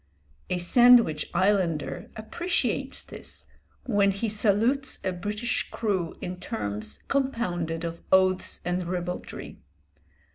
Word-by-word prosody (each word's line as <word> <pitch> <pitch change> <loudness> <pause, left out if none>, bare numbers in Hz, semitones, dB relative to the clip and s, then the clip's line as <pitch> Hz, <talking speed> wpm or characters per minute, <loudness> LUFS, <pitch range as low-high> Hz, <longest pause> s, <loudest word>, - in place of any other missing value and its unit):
A 180 - 0
Sandwich 230 -4 +5
Islander 185 -6 0
appreciates 345 +12 -2
this - - -10 0.4
when 205 -5 +3
he 200 +3 -1
salutes 220 +6 +2
a 185 - 0
British 210 +6 -2
crew 190 -7 -2
in 180 0 -5
terms 105 - -4
compounded 180 -12 -1
of 170 0 -5
oaths 185 0 +3
and 180 0 -1
ribaldry. 180 0 -5
190 Hz, 105 wpm, -26 LUFS, 175-220 Hz, 0.4 s, Sandwich